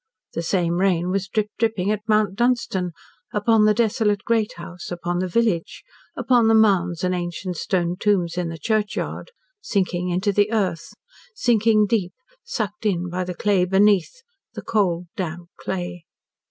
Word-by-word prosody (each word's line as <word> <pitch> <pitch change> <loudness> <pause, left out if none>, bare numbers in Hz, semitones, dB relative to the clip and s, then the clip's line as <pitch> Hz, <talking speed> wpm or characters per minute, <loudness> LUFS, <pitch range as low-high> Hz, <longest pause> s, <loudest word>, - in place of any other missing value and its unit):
The - - -2
same 170 0 0
rain 180 -2 +1
was 195 0 -1
drip 210 +2 -1
dripping 215 -4 +1
at 210 -1 -1
Mount 215 -3 +2
Dunstan 235 -5 0 0.4
upon 210 +1 +3
the 215 - +5
desolate 215 -2 +1
great 225 -2 +1
house 170 +1 -9
upon 175 0 -3
the 185 - -1
village 190 -3 0 0.3
upon 245 -6 +3
the 225 - +5
mounds 185 -6 +3
and 185 0 +1
ancient 180 +1 -4
stone 175 0 -1
tombs 180 -5 +1
in 180 -2 -2
the 165 - -6
churchyard, 215 - -2 0.3
sinking 180 - -1
into 185 +4 +1
the 205 +2 +2
earth 190 -7 -1 0.4
sinking 225 - +3
deep, 195 -4 0 0.3
sucked 215 - -4
in 180 -3 -1
by 185 +1 -1
the 180 0 -5
clay 200 0 +2
beneath 200 - +2 0.3
the - - -6
cold 180 -5 0
damp 175 -1 -5
clay. 175 -2 -5
195 Hz, 155 wpm, -22 LUFS, 175-215 Hz, 0.4 s, the